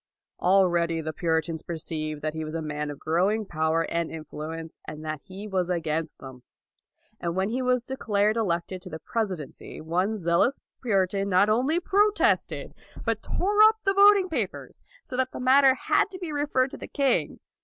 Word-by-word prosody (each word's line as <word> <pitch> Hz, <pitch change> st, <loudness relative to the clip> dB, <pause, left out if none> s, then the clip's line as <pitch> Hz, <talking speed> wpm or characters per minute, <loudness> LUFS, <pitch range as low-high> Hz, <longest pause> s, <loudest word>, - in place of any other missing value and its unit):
Al 190 Hz, +1 st, +5 dB
ready 170 Hz, -1 st, 0 dB
the 155 Hz, 0 st, -4 dB
Puritans 160 Hz, 0 st, -1 dB
perceived 155 Hz, -2 st, -5 dB
that 155 Hz, 0 st, -1 dB
he 160 Hz, 0 st, -4 dB
was 155 Hz, +1 st, -6 dB
a 165 Hz, -, -2 dB
man 150 Hz, -1 st, -3 dB
of 145 Hz, -, -6 dB
growing 190 Hz, +9 st, +1 dB
power 160 Hz, -1 st, 0 dB
and 170 Hz, 0 st, -2 dB
influence, 160 Hz, +1 st, -7 dB
and 155 Hz, +1 st, -7 dB
that 155 Hz, -2 st, -4 dB
he 195 Hz, +2 st, -8 dB
was 185 Hz, -3 st, -1 dB
against 160 Hz, -2 st, -2 dB
them; 130 Hz, -2 st, -11 dB, 0.8 s
and 170 Hz, 0 st, -3 dB
when 190 Hz, +2 st, 0 dB
218 -, -, -4 dB
LAUD -, -, 0 dB
he -, -, -1 dB
was 250 Hz, -1 st, +1 dB
declared 215 Hz, -5 st, 0 dB
elected 185 Hz, -4 st, -1 dB
to -, -, -10 dB
the 160 Hz, -, -6 dB
presidency 185 Hz, -, -5 dB
one 180 Hz, +7 st, -1 dB
zealous 175 Hz, +8 st, +1 dB, 0.2 s
Puritan 195 Hz, -3 st, +1 dB
not 190 Hz, +2 st, +4 dB
only 260 Hz, +10 st, +2 dB
protested, 415 Hz, +4 st, +1 dB, 0.3 s
but -, -, 0 dB
tore 415 Hz, +3 st, +1 dB
up 435 Hz, 0 st, +8 dB
the 390 Hz, -, +2 dB
voting 400 Hz, -1 st, +6 dB
papers, 325 Hz, -, -4 dB, 0.2 s
so 255 Hz, -, -7 dB
that 260 Hz, 0 st, 0 dB
the -, -, -6 dB
matter 265 Hz, +1 st, +5 dB
had 405 Hz, +10 st, +2 dB
to 380 Hz, -, -8 dB
be 350 Hz, -4 st, -5 dB
referred 285 Hz, -3 st, +1 dB
to -, -, -8 dB
the -, -, -8 dB
king. 275 Hz, -2 st, 0 dB
185 Hz, 185 wpm, -26 LUFS, 160-255 Hz, 0.8 s, up